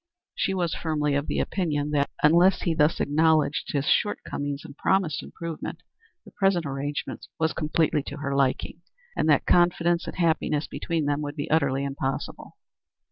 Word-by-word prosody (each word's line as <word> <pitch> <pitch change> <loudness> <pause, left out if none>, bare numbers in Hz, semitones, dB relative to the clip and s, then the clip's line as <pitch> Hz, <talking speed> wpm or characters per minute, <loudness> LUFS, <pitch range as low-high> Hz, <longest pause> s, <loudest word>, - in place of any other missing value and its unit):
She 190 - -1
was 175 -3 0
firmly 150 -3 -1
of 140 +1 0
the - - -2
opinion 150 -6 -1
that, 145 -1 +1
unless 170 +5 +5
he 170 - +1
thus 155 0 +2
acknowledged 155 0 +2
his 140 -1 -1
shortcomings 145 -8 -1
and - - -10
promised 175 -3 +1
improvement, 165 -2 -7 0.4
the - - -14
present 195 -4 +1
arrangement 140 +1 -4
was 160 0 +1
completely 155 -1 +1
to 145 - -6
her 140 -1 -3
liking, 140 +4 0 0.3
and 155 - +1
that 145 - +4
confidence 175 -1 +3
and - - -5
happiness 160 -3 +1
between 165 -3 -2
them 145 +1 0
would 145 0 -5
be 150 +1 -4
utterly 140 -3 +2
impossible. 135 -1 -4
155 Hz, 160 wpm, -26 LUFS, 145-170 Hz, 0.4 s, unless